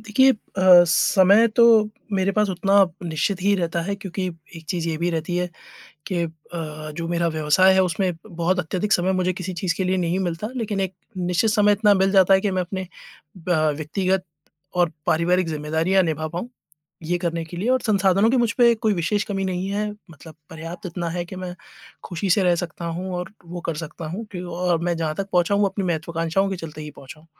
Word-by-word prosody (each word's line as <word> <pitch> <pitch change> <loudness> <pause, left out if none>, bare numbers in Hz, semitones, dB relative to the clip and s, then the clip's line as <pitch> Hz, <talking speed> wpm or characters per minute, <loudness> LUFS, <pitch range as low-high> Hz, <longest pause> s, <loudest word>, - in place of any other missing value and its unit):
देखिए 245 +5 +4
अ, - - -5 0.5
समय 200 +6 +5
तो 235 - +7 0.5
मेरे 195 0 +1
पास 210 -1 +2
उतना 195 +2 0 0.3
निश्चित 180 +4 -1
ही 200 +1 +3
रहता 170 -1 -1
है 200 +3 -2
क्योंकि 190 -1 -4 0.3
एक 165 - -11
चीज़ 170 -2 -2
ये 160 - -1
भी 175 +1 0
रहती 165 +2 -2
है 180 0 0 0.6
कि 175 -3 -1
अ, - - -4 0.7
जो 165 -1 -4
मेरा 170 0 0
व्यवसाय 155 +4 +4
है 190 - +4
उसमें 180 +1 0
बहुत 175 +2 -1
अत्यधिक 185 +4 -1
समय 185 +2 +2
मुझे 185 0 +1
किसी 185 +1 -5
चीज़ 170 -3 0
के 190 - -1
लिए 185 +1 +1
नहीं 175 +1 0
मिलता। 180 +4 -3
लेकिन 210 -4 -2
एक 190 -1 -2 0.2
निश्चित 180 +4 +1
समय 210 -2 +4
इतना 205 0 +4
मिल 190 0 +2
जाता 195 0 +6
है 190 - +4
कि 205 - 0
मैं 185 -1 0
अपने 190 +2 -5 0.7
अ, - - +3 0.2
व्यक्तिगत 185 +5 -1 0.5
और 175 -2 +2
पारिवारिक 175 +2 +2
ज़िम्मेदारियाँ 160 +5 +1
निभा 155 -2 -2
पाऊँ, 175 +9 -5 0.5
ये 175 +3 -1
करने 170 -1 -2
के 170 +2 -10
लिए 205 +7 -2
और 260 -1 +3
संसाधनों 195 -1 +3
की 260 - +2
मुझ 235 -2 +2
पे 235 -1 +6
कोई 220 -2 0
विशेष 195 +4 0
कमी 195 -1 -3
नहीं 185 0 -2
है, 210 +1 -1 0.2
मतलब 160 0 -13 0.2
पर्याप्त 165 +5 -8
इतना 170 0 -4
है 175 +1 -3
कि 185 - -9
मैं 185 -1 -6 0.5
खुशी 180 +2 -3
से 200 0 +4
रह 175 -1 +4
सकता 170 0 -5
हूँ, 175 +3 -4
और 180 +2 -5 0.2
वो 175 +1 -6
कर 165 - -1
सकता 160 +1 -7
हूँ, 205 +8 -5
क्यू 180 -1 -6
अ, - - -6
और 175 -1 +1
मैं 175 -1 0
जहाँ 155 -2 -1
तक 195 0 -3
पहुँचा 180 +2 +2
हूँ 205 0 +3
अपनी 195 0 -3
महत्वाकांक्षाओं 165 +3 -1
के 190 - -2
चलते 155 -3 -8
ही 150 - -7
पहुँचा 140 +3 -12
हूँ। 160 - -22
180 Hz, 215 wpm, -22 LUFS, 170-195 Hz, 0.7 s, तो